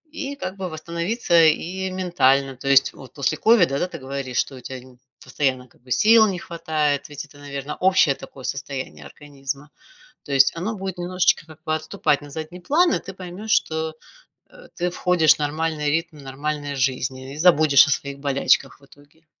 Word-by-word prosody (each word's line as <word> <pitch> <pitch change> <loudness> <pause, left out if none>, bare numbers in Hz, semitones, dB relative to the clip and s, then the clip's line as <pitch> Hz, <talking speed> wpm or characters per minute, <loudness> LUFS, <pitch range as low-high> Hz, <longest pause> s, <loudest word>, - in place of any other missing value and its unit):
и 285 -3 -4
как 185 -7 -6
бы 190 -2 -4
восстановиться 170 +3 +1
и 185 +4 0
ментально. 140 -8 +2
То 135 +2 -9
есть 135 0 +5
вот 130 -2 -13
после 150 +1 -1
ковида, 180 -9 +4
да, - - +1
ты 175 - -8
говоришь, 130 -1 -5
что 135 - 0
у - - -10
тя 130 - -7
н 125 -1 -17 0.2
постоянно 130 -3 -1
как - - -28
бы 125 0 -16
сил 220 - +6
не 190 -3 -2
хватает, 155 -4 -2
ведь 145 -2 -7
это, 145 - -19
наверно, 140 0 -6
общее 185 -6 +4
такое 135 - -12
состояние 130 - -5
организма. 140 - -7 0.5
То - - -9
есть 135 +2 +5
оно 200 +7 -3
будет 190 -1 -5
немножечко 175 -2 +1
как 160 -1 -16
бы 155 -2 0
отступать 155 -2 0
на 145 - -11
задний 160 +4 -7
план, 325 - +3
и - - -1
ты 195 - -9
поймешь, 190 +4 -7
что, 160 -3 0 0.6
э, - - -16
ты 180 0 -1
входишь 175 -3 +3
в - - -21
нормальный 150 0 -1
ритм 160 0 -2
нормальной 145 +1 -4
жизни 130 0 -2
и - - -10
забудешь 155 -5 +6
о - - -2
своих 140 0 -2
болячках 140 -1 +1
в - - -20
итоге. 145 +3 -22
150 Hz, 190 wpm, -22 LUFS, 140-180 Hz, 0.6 s, сил